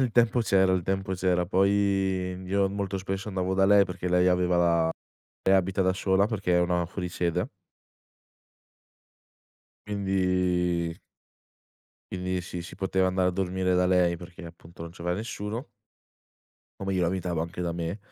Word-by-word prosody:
il 125 -4 +1
tempo 120 0 +3
c'era, 95 -4 +3
il 90 -2 +1
tempo 95 0 -2
c'era, 90 -1 +1
poi 95 -1 +1
io 95 +1 +1
molto 100 -1 -3
spesso 95 +2 -4
andavo 95 -1 -1
da 95 0 +3
lei, 100 0 +6
perché 90 0 -5
lei 90 +1 +3
aveva 90 0 +2
la 85 -1 +3 0.6
lei 95 - +6
abita 95 +1 +1
da 95 0 +2
sola 95 +1 +2
perché 100 -6 0
è - - +4
una 90 0 +1
fuori 90 0 -5
sede 90 0 -1 2.4
Quindi 90 -4 0 1.2
quindi 90 0 -2
sì, 90 0 -6
si 85 - -9
poteva 95 -1 0
andare 95 0 +1
a - - +2
dormire 90 0 -1
da 90 0 +3
lei 90 -2 +2
perché 85 -1 -11
appunto 85 0 -12
non 85 - -7
c'aveva 90 0 -3
nessuno 110 +3 -5 1.1
O - - -4
meglio 95 -3 +1
abitava 90 -2 -1
anche 85 +2 -6
da 85 -1 -1
me, 85 +4 -4
90 Hz, 155 wpm, -27 LUFS, 90-95 Hz, 2.4 s, lei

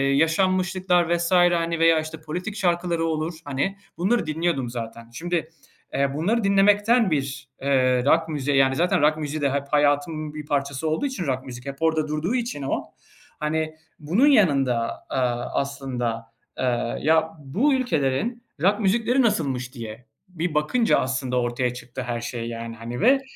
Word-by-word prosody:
yaşanmışlıklar 180 +2 +2
vs. 170 +1 -2
hani, 175 -2 +3
veya, 165 -1 +5
işte, 155 0 -6
politik 180 +7 -5
şarkıları 175 -3 0
olur, 160 +1 -1
hani, 145 +8 -2 0.2
bunları 200 +4 +1
dinliyordum 155 -5 -1
zaten. 115 -1 -7
Şimdi, 165 +3 -2 0.4
eee, 140 0 +1
bunları 205 +10 0
dinlemekten 205 +2 +4
bir, 140 -1 -2
eee, 130 -2 +2
rock 160 +3 +3
müziğe, 145 -2 0
yani, 135 0 +4
zaten 180 +2 +2
rock 155 +1 +3
müziği 150 0 -4
de 140 -1 +2
hep 140 0 -1
hayatımın 150 +1 +1
bir 150 -1 -7
parçası 140 0 -1
olduğu 155 - 0
için, 260 -10 -3
rock 130 0 -2
müzik 125 -1 -9
hep 140 0 -5
orada 160 -1 +1
durduğu 155 +10 -1
için 235 - -2
o, 135 - -2 0.6
hani, 155 +1 -1 0.2
bunun 180 - +3
yanında, 135 - +2
aaa, 125 -2 -1
aslında, 125 -5 -4 0.3
eee, 120 -2 -1
"Ya, 160 +2 +3
bu 200 - +1
ülkelerin 230 - 0 0.2
rock 200 +4 +3
müzikleri 230 +5 +2
nasılmış?" 135 - 0
diye 115 0 -8 0.2
bir 175 -2 -3
bakınca 160 +11 +2
aslında 130 -1 -1
ortaya 120 +1 -1
çıktı 125 +1 -7
her 120 -2 -3
şey 120 -1 -4
yani, 115 0 -6
hani, 115 +2 -6
ve 270 +5 +5
155 Hz, 155 wpm, -24 LUFS, 130-180 Hz, 0.6 s, veya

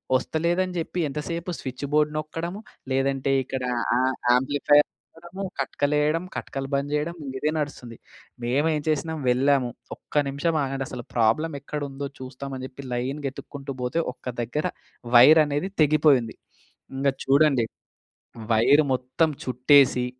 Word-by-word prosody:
వస్తలేదని 175 +7 0
చెప్పి 170 +2 -4
ఎంతసేపు 165 +5 -4
స్విచ్‌బోర్డ్ 145 +3 -1
నొక్కడం, 165 +4 -4 0.4
లేదంటే 135 0 +1
ఇక్కడ 130 0 -4 0.3
ఆహ్, - - +3
ఆహ్, 130 - -2 0.2
యాంప్లిఫైయర్ 145 +3 +3 0.3
నొక్కడము, 175 +4 -8 0.2
కట్కలు 145 +2 0
ఎయడం, 155 +4 +1
కట్కలు 135 0 -5
బంద్ 140 +1 -1
చేయడం, 150 +3 -1
ఇంగ 130 -1 -6
ఇదే 150 - +1
నడుస్తుంది. 125 -6 -5 0.5
మేము 140 +6 +1
ఏం 150 - -2
చేసినాము 155 0 -1
వెళ్ళాము 130 0 +2 0.3
ఒక్క 145 -1 -1
నిమిషం 155 +4 0
ఆగండి 135 0 -3
అసలు 120 -2 -7
ప్రాబ్లమ్ 140 +7 +2
ఎక్కడ 150 +1 -5
ఉందో 140 +1 -5
చూస్తామని 130 0 -6
చెప్పి 135 +1 -11
లైన్‌గా 135 +3 -2
ఎతుక్కుంటూ 140 -1 -8
పోతే, 145 +7 0
ఒక్క - - -30 0.2
దగ్గర 135 +7 -2 0.5
వైర్ 155 +7 +8
అనేది 145 +6 -2
తెగిపోయి 150 -2 +5
ఉంది. 110 - -9 0.6
ఇంగ 140 +1 0 0.2
చూడండి, 140 -3 +4 0.9
వైర్ 140 +7 +5
మొత్తం 130 +6 +1 0.2
చుట్టేసి 130 0 +4
140 Hz, 135 wpm, -25 LUFS, 130-155 Hz, 0.9 s, వైర్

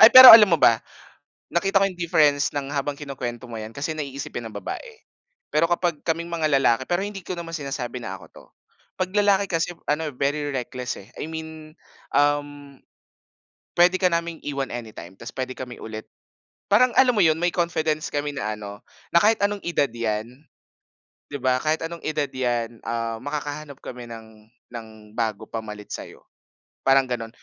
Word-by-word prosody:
Ay 220 - +12
pero 255 0 +13
alam 215 -3 +10
mo 165 - +4
ba, 115 -1 +5 0.7
nakita 195 +3 +2
ko - - +5
yung 180 -2 -9
difference 150 -3 +3
ng 140 -1 -3
habang 140 0 -2
kinukwento 130 -4 -6
mo 120 -2 -7
‘yan 110 +1 -7
kasi 145 +3 -2
naiisipin 140 -5 -5
ng 105 - -15
babae. 480 -2 -6 0.6
Pero 165 +2 +3
kapag 175 -3 0
kaming 170 +1 -2
mga 160 -2 +1
lalaki, 125 -1 +3
pero 175 +1 +1
hindi 205 -1 -6
ko 180 +1 -5
naman 165 -1 -7
sinasabi 135 -4 -4
na 95 -5 -5
ako 90 - -14
‘to. - - -15 0.5
‘Pag 185 0 -2
lalaki 200 -1 +3
kasi 165 0 -1
ano 150 +1 0
eh, - - -12
very 145 +3 -1
reckless 125 -2 -4
eh. 100 - -12
I 155 - -5
mean, 160 0 -8 0.4
um, 145 -1 0 1.0
pwede 180 +2 +5
ka 185 - +4
naming 170 -1 -2
iwan 140 -2 -3
anytime 110 -7 -8
tas 115 +4 -9
pwede 130 0 -4
kami 125 -1 -8
ulit 110 0 -7 0.6
parang 245 +5 +5
alam 255 -2 +6
mo 210 - +3
yun, 160 -2 +4
may 175 +1 +1
confidence 160 -3 0
kami 145 0 -2
na 110 -5 -3
ano, 100 0 -9 0.3
na 170 - +7
kahit 220 +1 +4
anong 205 0 0
edad 155 -6 0
‘yan, 110 -2 -2 1.0
‘di 145 - -5
ba 130 0 +3
kahit 155 +3 0
anong 170 0 -6
edad 150 -2 -1
‘yan, 120 -3 -2
ah, 115 -1 -2
makakahanap 145 +1 -5
kami 125 -1 -8
ng 110 -2 -12 0.3
ng 115 -2 -7 0.3
bago 110 -3 -1
pamalit 105 -2 -7
sa’yo. - - -8 0.6
Parang 135 0 +5
gano’n, 120 -3 -3
145 Hz, 175 wpm, -24 LUFS, 120-170 Hz, 1.0 s, pero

